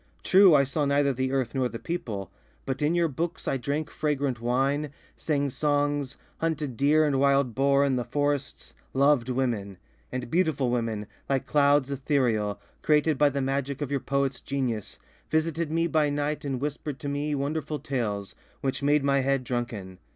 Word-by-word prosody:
True, 190 -3 +7
I 140 - +6
saw 140 +3 -1
neither 140 0 +2
the 130 +1 -1
earth 130 -4 -1
nor 130 -2 0
the 115 - -6
people, 110 - -4 0.3
but 135 0 -3
in 150 +3 +2
your 170 -1 +3
books 165 +3 -4
I 135 - +1
drank 145 +4 -3
fragrant 140 -5 -1
wine, 135 +5 +1 0.3
sang 140 -3 -1
songs, 145 -1 0 0.2
hunted 155 -5 -2
deer 150 +5 +4
and 140 -3 +1
wild 140 -3 +3
boar 140 +3 +3
in 135 -2 +1
the 125 - -1
forests, 145 +2 -2 0.2
loved 135 -2 +3
women... 115 -7 -1 0.3
And 125 -2 -4
beautiful 160 -8 +1
women, 115 -3 -1 0.2
like 135 -2 +1
clouds 140 -1 +3
ethereal, 125 -7 0 0.2
created 150 -1 +2
by 145 - +5
the 140 0 -2
magic 135 0 -2
of 145 -2 -3
your 140 - +1
poets' 140 0 -1
genius, 125 -7 -3 0.3
visited 160 0 0
me 165 +1 +1
by 155 -3 +2
night 145 +1 -2
and 135 -3 -2
whispered 145 0 -4
to - - -4
me 145 +1 -1
wonderful 150 +2 -2
tales, 105 -9 -3 0.3
which 135 -1 -2
made 145 0 +3
my 140 0 +3
head 135 0 +1
drunken. 115 -7 -4
140 Hz, 175 wpm, -27 LUFS, 130-150 Hz, 0.3 s, True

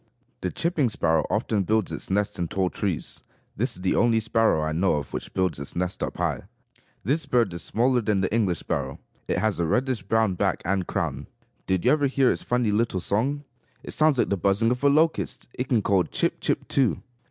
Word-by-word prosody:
The 90 - -2
chipping 160 -7 0
sparrow 80 -6 +1
often 105 -1 0
builds 110 +2 0
its - - -5
nest 100 0 -1
in 85 - -1
tall 95 +1 -1
trees. 95 -6 -3 0.3
This - - -1
is 90 - -10
the 95 - +2
only 115 -1 +3
sparrow 110 -7 +2
I 80 - -1
know 85 +3 +2
of, 70 -3 -5
which - - -5
builds 90 -6 0
its 70 - -6
nest 90 +1 -2
up - - -3
high. - - -1 0.6
This 145 - 0
bird 115 -7 +2
is 85 - -5
smaller 125 +7 +2
than 105 -3 +1
the 95 - -1
English 100 -7 +1
sparrow. 70 -2 -3 0.3
It - - 0
has 110 -4 0
a 85 - +1
reddish 125 +3 0
brown 110 0 +1
back 90 - -1
and 95 0 0
crown. - - -3 0.4
Did 95 +2 0
you 125 - +5
ever 145 -2 +3
hear 135 -1 +3
its - - -2
funny 120 -3 0
little 105 -2 +1
song? 130 +11 0 0.4
It - - -7
sounds 155 -3 +3
like - - +2
the 100 - +1
buzzing 100 +5 +2
of 125 +2 -2
a 140 - +6
locust. 155 +3 +1
It 125 +1 -4
can 115 -5 +2
call, 95 -3 +2
chip! - - -1
chip! - - -1
too. 130 -5 +1
105 Hz, 215 wpm, -25 LUFS, 90-125 Hz, 0.6 s, a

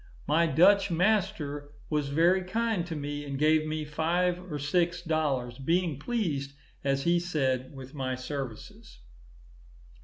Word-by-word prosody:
My 165 +3 +3
Dutch 195 +6 +5
master 175 -6 0 0.2
was 150 -2 -1
very 170 +6 +3
kind 220 -2 -1
to 165 - -4
me, 145 0 -4
and 140 -1 -4
gave 155 +1 +3
me 155 0 -3
five 175 +4 0
or 150 - -2
six 170 +5 +1
dollars, 140 -7 -1
being 165 0 0
pleased, 150 - -2 0.3
as 135 0 +1
he 175 0 +3
said, 135 -6 -1
with 135 0 -10
my 130 -3 -2
services. 130 -3 -7
155 Hz, 135 wpm, -29 LUFS, 140-175 Hz, 0.3 s, Dutch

